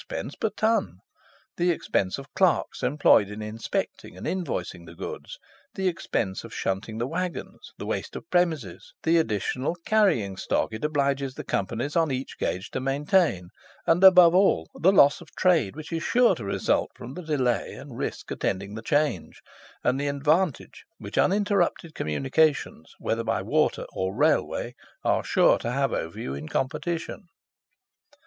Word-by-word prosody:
_ - - -5
per 220 - +1
ton: 220 - 0 0.6
the 175 +1 +2
expense 100 - 0
of 135 0 -11
clerks 185 -3 +1
employed 125 -6 +4
in 105 +1 -7
inspecting 110 +1 -4
and - - -8
invoicing 185 -2 -3
the - - -11
goods, - - -7 0.4
the 190 -1 0
expense 115 - -2
of - - -10
shunting 95 +3 -3
the 120 - -1
waggons, 175 +5 -5
the - - -6
waste - - -4
of - - -8
premises, 160 - -1
the 165 +1 +4
additional 130 - -1
carrying 180 - +2
stock 100 - -1
it 110 - -6
obliges 140 -3 0
the - - -6
Companies 115 +9 -2
on 165 -2 +3
each 130 0 -4
gauge 95 +2 -2
to - - -2
maintain, 135 - +1 0.4
and, 170 +3 +3
above 180 -3 +9
all, 180 - +3
the 185 - +3
loss 145 -7 +5
of 165 - -15
trade 165 - +2
which 155 +2 -8
is 165 - -1
sure 245 +6 +4
to 115 - -6
result 100 - 0
from 125 - -9
the 180 - -7
delay 135 -7 0
and - - -10
risk - - -4
attending 100 +1 -2
the 110 - -6
change, 145 - -1 0.4
and 125 +2 +1
the 145 - -1
advantage 150 +3 0
which - - -8
uninterrupted 195 -5 +1
communications, 135 - 0
whether 115 +1 -2
by 115 0 0
Water - - +1
or 95 +1 -2
Railway, 145 -3 +1 0.3
are - - +1
sure - - +4
to - - -3
have 135 +1 0
over 80 +1 -4
you 65 - -4
in 70 +3 -7
competition. 170 +7 -3
145 Hz, 160 wpm, -26 LUFS, 110-175 Hz, 0.6 s, above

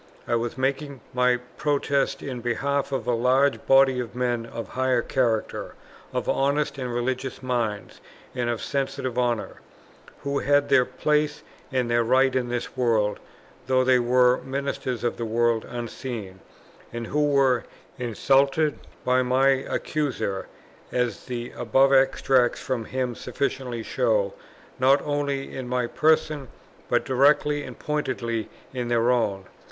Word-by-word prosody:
I - - -1
was 120 +1 -1
making 140 +1 -2
my 125 0 +3 0.2
protest 140 -1 0
in 130 -3 -5
behalf 140 +4 -1
of 135 - -2
a 125 - +1
large 130 +4 +2
body 135 -1 +5
of 120 -1 -5
men 120 -2 -1
of 115 -1 -7
high 130 -1 +1
character, 115 -5 -1 0.4
of - - -3
honest 140 +1 +1
and 125 -2 -3
religious 130 +2 -3
minds, 115 -6 -2 0.3
and 120 -2 -1
of 120 -2 -2
sensitive 135 -3 -2
honour, 120 -3 -1 0.6
who 140 0 -1
had 145 +1 +2
their 125 - +5
place 150 +3 0 0.3
and 130 -2 0
their 120 0 +2
rights 130 +2 +3
in 125 -2 0
this 120 +1 -4
world, 115 -5 +1 0.5
though 130 -1 +3
they 130 -1 +4
were 125 +1 +3
ministers 135 -2 -3
of 120 - -1
the 115 - -3
world 115 0 +1
unseen, 120 -5 -6 0.5
and 120 0 -5
who 150 +4 +1
were 135 -4 +3 0.4
insulted 135 +5 +2 0.3
by 125 0 +3
my 130 +2 +3
Accuser, 135 -5 -1 0.4
as 125 -1 -1
the 120 -1 -4
above 135 +4 +3
extracts 130 -2 +3
from 125 -4 -3
him 130 0 -2
sufficiently 125 -1 -3
show, - - +1 0.5
not 135 +2 +5
only 145 -2 -2
in 130 -2 -5
my 125 -1 0
person, 155 +1 +1 0.4
but - - +2
directly 145 +2 +3
and 125 -3 -8
pointedly 125 -7 -2 0.2
in 125 -2 -3
their 120 0 +2
own. 100 -6 0
130 Hz, 140 wpm, -25 LUFS, 120-135 Hz, 0.6 s, body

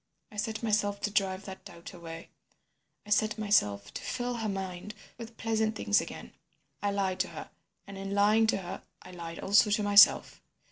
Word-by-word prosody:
I 210 - -12
set 215 +2 -3
myself 205 -2 +1
to 210 - -1
drive 195 -1 0
that 190 -1 -9
doubt 170 +2 -11
away—I 170 +4 -14
set 215 +1 +2
myself 105 - +1
to - - -6
fill 245 -1 -3
her 220 -2 -2
mind 190 +1 -5 0.2
with 230 -1 -9
pleasant 220 -1 0
things 210 -1 +2
again. - - -9 0.5
I 205 - 0
lied 195 -2 -1
to - - +1
her, - - -9 0.3
and 200 -1 -9
in 195 +1 -4
lying 215 +2 +4
to - - +2
her 190 0 -7 0.2
I - - -12
lied 170 -2 -8
also 200 +1 +4
to 210 0 +1
myself. 205 0 +6
205 Hz, 180 wpm, -30 LUFS, 190-215 Hz, 0.5 s, myself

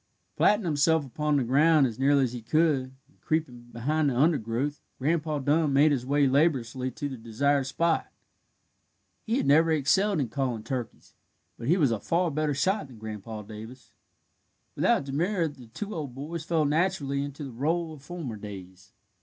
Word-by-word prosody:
Flattening 210 -1 +3
himself 160 0 +2
upon 150 +3 -1
the 135 - +1
ground 145 +4 +4
as 120 -2 -4
nearly 140 +1 +4
as 125 -2 -1
he 120 - -6
could, 135 0 +1
and 150 - -31
creeping 130 -7 -2
behind 145 +6 0
the 125 - -2
undergrowth, 140 -1 +1 0.2
Grandpa 155 +2 0
Dun 145 +1 +1
made 145 +3 +5
his 130 -3 -1
way 145 0 +3
laboriously 130 -3 +1
to 145 +3 -5
the 135 -2 -6
desired 135 +5 0
spot. 165 +4 0 1.2
He 230 +3 +1
had - - 0
never 155 +4 +5
excelled 160 +6 +2
in 130 -5 -1
calling 125 -5 -2
turkeys, 125 0 -6 0.4
but 115 - -7
he 170 +6 +4
was 145 -9 +3
a 115 - -1
far 170 - 0
better 150 0 0
shot 185 +4 0
than 125 -3 -14
Grandpa 110 0 -7
Davis. 110 +5 -11 0.8
Without - - +2
demur 165 +6 0
the 130 -5 -11
two 205 - -6
old 145 -7 -5
boys 155 +4 -6
fell 160 -2 +1
naturally 145 -3 0
into 145 +1 -7
the 135 - -6
rôle 160 +6 -1
of 150 - -12
former 145 -7 -6
days. 95 -2 -10
140 Hz, 175 wpm, -27 LUFS, 125-160 Hz, 1.2 s, made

